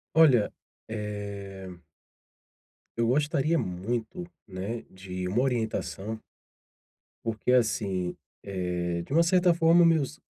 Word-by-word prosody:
Olha, 135 -10 +6 0.4
eh 100 -3 -5 1.3
eu 115 - +2
gostaria 150 +4 +2
muito, 110 - -3 0.2
né, 100 +4 -5
de 95 -1 -6
uma 105 +7 +1
orientação 110 -3 -2 1.0
porque 115 +2 0
assim, 100 -7 +1 0.3
eh, 90 -3 -2
de - - -8
uma 165 +3 +5
certa 175 0 +4
forma 170 +1 +5
meus 150 -3 +1
110 Hz, 100 wpm, -28 LUFS, 95-140 Hz, 1.3 s, Olha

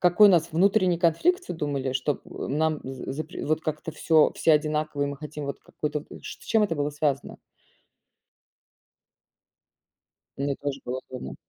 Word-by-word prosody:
какой 180 +4 +7
у - - +7
нас 170 -2 +3
внутренний 185 0 +3
конфликт, 255 - +3
всё - - -5
думали, 140 -4 -2
что, 140 +2 0
э, - - -6
нам 155 +2 +1
з 135 0 -6
запр 155 +4 -6
вот 155 +1 +1
как-то 155 0 -4
всё 160 -1 +4
все 160 - +3
одинаково, 150 -1 +1
и - - +1
мы 140 0 -4
хотим 150 0 -7
вот 140 -1 -5
какую-то, 150 0 -4
вот - - -11
ч - - -6
с - - -15
чем 220 -2 +3
это 170 - -1
было 145 -1 -1
связано? 145 -2 -1 3.0
Мне 140 +1 -1
тоже 140 -1 -4
было 125 +1 -3
удобно. 95 - -7
150 Hz, 170 wpm, -26 LUFS, 140-165 Hz, 3.0 s, какой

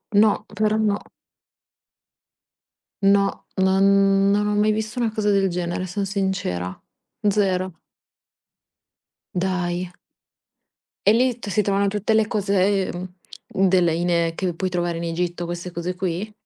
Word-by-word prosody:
No, 210 0 +4
però 215 0 +1
no. 210 -2 +1 2.0
No, 200 0 +2
non 195 +1 +4
non 210 0 +2
ho 210 - 0
mai 210 +1 +3
visto 220 +3 -3
una 235 -2 +1
cosa 215 -1 0
del 195 -1 +3
genere, 180 +1 -3
sono 200 +3 -3
sincera. 190 - -2 0.5
Zero. 185 -3 0 1.6
Dai? 180 -1 -1 1.2
E 205 - +7
lì 245 +1 +2
t - - -8
si 210 +2 +2
trovano 200 0 +1
tutte 210 +2 0
le 220 -1 +3
cose, 200 -3 +1
uhm, 185 +1 -4
della 180 -2 +3
in 170 0 +1
che 180 -1 -2
puoi 185 +3 -2
trovare 175 -1 -1
in 170 - -4
Egitto 175 +1 -2
queste 175 +1 -5
cose 175 +1 -4
qui? 185 +3 -3
190 Hz, 130 wpm, -22 LUFS, 175-205 Hz, 2.0 s, E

